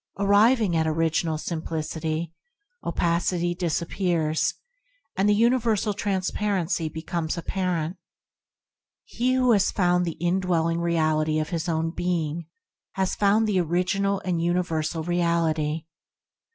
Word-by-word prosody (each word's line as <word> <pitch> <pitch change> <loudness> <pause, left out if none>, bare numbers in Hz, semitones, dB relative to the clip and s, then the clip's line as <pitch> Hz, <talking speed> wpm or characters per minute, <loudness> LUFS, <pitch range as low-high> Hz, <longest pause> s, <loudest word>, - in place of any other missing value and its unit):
Arriving 205 0 +4
at 160 -1 +2
Original 160 0 0
Simplicity, 160 0 -3 0.5
opacity 175 +1 0
disappears, 170 -2 0 0.6
and 195 +2 +2
the 205 - +4
universal 225 -2 +2
transparency 190 -3 -1
becomes 160 +1 -3
apparent. 175 -1 -2 1.1
He 250 +2 -1
who 255 -1 +3
has 200 -3 +4
found 180 -2 +2
the 165 - -4
indwelling 175 -1 +1
Reality 155 -2 +1
of 155 -1 -1
his 170 0 -2
own 165 0 0
being 170 -2 -2 0.5
has 190 -1 0
found 210 +2 +3
the 200 -3 +2
original 190 +4 0
and 175 -3 0
universal 165 -2 -1
Reality. 165 -3 0
175 Hz, 110 wpm, -25 LUFS, 160-195 Hz, 1.1 s, Arriving